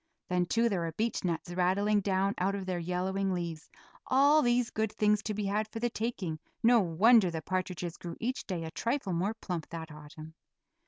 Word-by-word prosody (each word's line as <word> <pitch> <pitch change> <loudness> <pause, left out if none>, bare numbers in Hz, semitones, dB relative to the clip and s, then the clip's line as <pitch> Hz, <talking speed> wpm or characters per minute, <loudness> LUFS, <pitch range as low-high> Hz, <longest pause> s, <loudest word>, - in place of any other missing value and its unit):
Then 180 -1 +1
too 230 +5 +2
there 200 -5 0
were 165 -1 -3
beechnuts 175 -5 -2
rattling 200 +4 +2
down 195 0 +1
out 195 +2 +1
of 195 -1 -4
their 185 -2 -2
yellowing 185 +3 -1
leaves 170 -3 -5 0.4
all 285 +3 +5
these 240 -2 +2
good 220 -1 -1
things 210 -1 +2
to 215 -1 -3
be 210 0 -2
had 210 +2 0
for 225 - -7
the 240 +1 0
taking; 205 -9 -3 0.2
no 235 +1 +6
wonder 200 +3 +5
the 160 -2 -5
partridges 180 -2 -3
grew 170 -1 -7
each 250 +3 -3
day 180 -5 -3
a 160 - -6
trifle 235 - -2
more 190 +6 0
plump 175 -7 -5
that 165 -1 -7
autumn. 155 +1 -11
190 Hz, 195 wpm, -30 LUFS, 175-220 Hz, 0.4 s, no